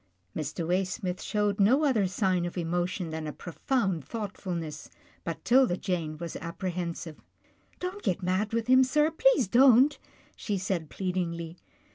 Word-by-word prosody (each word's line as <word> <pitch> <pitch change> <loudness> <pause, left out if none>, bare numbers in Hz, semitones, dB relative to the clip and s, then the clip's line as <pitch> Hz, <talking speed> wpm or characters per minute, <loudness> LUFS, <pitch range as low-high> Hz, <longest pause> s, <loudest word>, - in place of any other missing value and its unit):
Mr. 160 +2 -3
Waysmith 185 +2 -1
showed 210 -1 0
no 250 +10 +4
other 235 -10 +3
sign 185 -2 0
of 175 +1 -4
emotion 175 +1 -2
than 160 -1 -4
a - - -3
profound 190 - -2
thoughtfulness, 175 - -5 0.3
but 165 - -5
'Tilda 250 -7 +4
Jane 165 -6 -3
was 170 0 -6
apprehensive. 170 -2 -5 0.3
" - - -35
Don't 365 +3 -4
get 185 - -1
mad 185 +4 0
with 230 0 0
him, 260 +2 +6
sir, 300 +4 +2
please - - +3
don't," 260 +5 +5 0.4
she 205 -2 -2
said 180 -5 -2
pleadingly. 175 -3 -3
185 Hz, 145 wpm, -28 LUFS, 170-230 Hz, 0.4 s, him